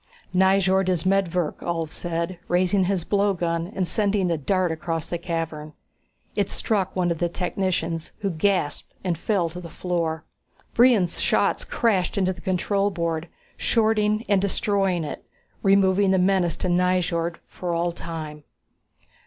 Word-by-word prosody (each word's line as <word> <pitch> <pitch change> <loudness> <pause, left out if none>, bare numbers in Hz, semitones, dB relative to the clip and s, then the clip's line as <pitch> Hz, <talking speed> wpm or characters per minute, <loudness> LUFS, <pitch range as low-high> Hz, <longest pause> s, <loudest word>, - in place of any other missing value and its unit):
"Nyjord 190 0 +3
is 175 -3 0
medvirk," 180 -4 +1
Ulv 165 -2 -3
said, 170 +1 -3
raising 185 +2 +2
his 185 -2 0
blowgun 175 -5 0
and 185 -2 0
sending 200 -3 +1
a 165 - +1
dart 185 +3 +1
across 165 -1 -3
the 175 - -4
cavern. 165 -3 -4 0.6
It - - 0
struck 200 -5 0
one 180 -2 +1
of 165 - -2
the 175 - +1
technicians, 175 -2 -2
who 200 -2 0
gasped 170 -2 -1
and 180 -3 0
fell 175 +1 0
to 175 +2 -8
the 170 - -9
floor. 165 -2 -2 0.5
Brion's 230 -8 +4
shots - - +2
crashed 205 -5 0
into 185 -1 +2
the 175 - -14
control 195 +2 +1
board, 170 -3 -2 0.3
shorting 215 -1 +2
and 200 -2 +3
destroying 195 -3 +1
it, 150 - -6 0.4
removing 195 0 +4
the 190 - +4
menace 185 -3 +2
to - - -2
Nyjord 175 -1 +1
for 180 -1 -5
all 170 +1 0
time. 160 -3 -7
180 Hz, 145 wpm, -24 LUFS, 170-195 Hz, 0.6 s, Brion's